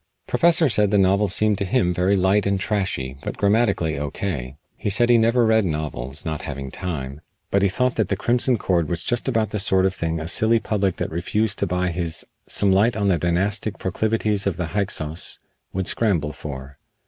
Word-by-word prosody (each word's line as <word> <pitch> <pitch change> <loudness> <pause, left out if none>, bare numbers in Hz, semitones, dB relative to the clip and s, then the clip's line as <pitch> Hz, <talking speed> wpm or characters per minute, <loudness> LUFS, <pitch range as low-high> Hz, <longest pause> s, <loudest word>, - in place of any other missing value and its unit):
Professor 170 -1 +3
said 105 -5 +2
the 105 - +2
novel 100 +2 +3
seemed 105 +2 +2
to - - 0
him 95 -2 +1
very 95 +3 +2
light 95 +2 +2
and 100 -1 +1
trashy, 95 -11 -2
but - - -5
grammatically 100 -8 +1
O.K. 70 -3 -4 0.2
He - - -3
said 120 +4 +3
he 120 - +6
never 115 +1 +3
read 110 0 +3
novels, 75 -5 -4
not 80 -2 -3
having 70 -2 -6
time, 75 -6 -5 0.3
but 100 - +2
he 100 - +3
thought 125 +6 0
that 110 -4 +1
"The 100 - +1
Crimson 120 +3 +2
Cord" 85 -6 0
was 85 -1 -1
just 120 +1 -1
about 110 -5 0
the 105 - -2
sort 95 -1 +2
of 95 - +1
thing 80 -3 -2
a 80 - -5
silly 110 +6 +3
public 100 -5 -1
that - - -4
refused 100 +6 -1
to 100 - +1
buy 90 +1 0
his 85 -2 -3 0.2
"Some 100 - +2
Light 105 +5 +3
on 100 -2 +1
the 90 -3 +2
Dynastic 100 +5 0
Proclivities 105 +1 0
of 95 - -1
the 90 -3 -3
Hyksos" 90 -6 -1 0.3
would 95 0 -2
scramble 85 -11 +1
for. 70 -2 -9
95 Hz, 200 wpm, -22 LUFS, 80-105 Hz, 0.3 s, he